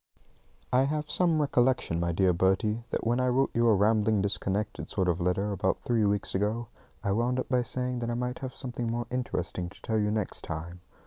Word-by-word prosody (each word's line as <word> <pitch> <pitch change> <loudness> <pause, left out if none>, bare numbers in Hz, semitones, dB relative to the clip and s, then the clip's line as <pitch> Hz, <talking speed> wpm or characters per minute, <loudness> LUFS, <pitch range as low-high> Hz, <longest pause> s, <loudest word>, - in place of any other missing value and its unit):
I 130 +2 +5
have 150 +1 -2
some 170 -2 +3
recollection, 125 - +2
my 85 0 0
dear 90 +1 +3
Bertie, 105 +6 +1
that - - -2
when 120 +2 +2
I 125 - +2
wrote 130 +2 +2
you 120 0 +3
a 110 - +6
rambling 105 +1 +3
disconnected 100 +1 -1
sort 95 -3 0
of 90 0 0
letter 95 +4 0
about 100 -1 -1
three 115 -3 +2
weeks 100 0 0
ago, 105 +4 -1 0.3
I 100 - 0
wound 120 +5 +1
up - - -3
by 125 -1 +3
saying 125 +1 -2
that 120 -1 -3
I 120 - -1
might 125 +1 -3
have 130 -2 -6
something 120 -3 -4
more 120 +1 -2
interesting 90 -8 -2
to - - -14
tell 110 -1 -1
you 105 0 +1
next 105 -2 -2
time. 85 +2 -6
110 Hz, 210 wpm, -29 LUFS, 95-125 Hz, 0.3 s, a